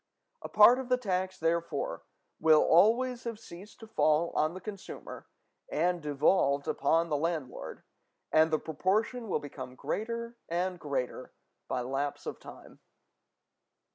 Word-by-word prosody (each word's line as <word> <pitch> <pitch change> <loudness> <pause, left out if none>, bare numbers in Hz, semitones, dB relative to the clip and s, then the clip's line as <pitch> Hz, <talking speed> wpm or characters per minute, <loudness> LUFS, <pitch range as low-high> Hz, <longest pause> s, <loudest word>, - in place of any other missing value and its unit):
A - - -7
part 220 +4 +7
of 260 -1 -6
the 250 - +3
tax, 185 -5 -2
therefore, 165 -3 -1 0.4
will 155 -1 +5
already 235 +8 +4
have 230 -2 -4
ceased 195 0 -13
to 225 - -10
fall 165 -6 +2
on 155 +3 0
the - - -6
consumer 200 0 -9 0.4
and 180 - 0
devolved 145 -1 +2
upon 165 +4 +1
the 150 - +1
landlord, 160 -3 -4 0.5
and 160 +1 +5
the 155 - +2
proportion 205 - -1
will - - +1
become 130 -3 -8
greater 235 - -4
and 180 +1 -1
greater 140 -5 -4 0.3
by 125 - -2
lapse 140 +3 -3
of - - -5
time. - - -13
170 Hz, 140 wpm, -30 LUFS, 150-215 Hz, 0.5 s, part